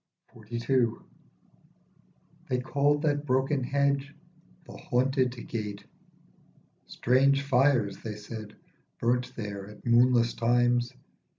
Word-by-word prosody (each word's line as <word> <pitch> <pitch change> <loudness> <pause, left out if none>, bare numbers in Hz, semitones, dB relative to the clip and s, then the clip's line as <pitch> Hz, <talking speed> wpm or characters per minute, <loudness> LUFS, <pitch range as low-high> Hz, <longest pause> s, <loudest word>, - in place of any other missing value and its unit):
46 120 0 -7
XLII. 130 -3 +3 1.6
THEY 125 - +1
called 145 +3 +1
that 145 -2 +1
broken 135 +1 +1
hedge 140 +2 0 0.5
The - - -12
Haunted 130 0 +1 0.2
Gate. 105 -3 -5 1.0
Strange 140 +3 +2
fires 130 -7 +2
(they 110 -2 -5
said) 105 0 -9 0.4
burnt 125 +1 0
there 100 -3 -6
at 105 - -15
moonless 120 0 +4
times. 120 +1 +2
125 Hz, 100 wpm, -28 LUFS, 115-140 Hz, 1.6 s, moonless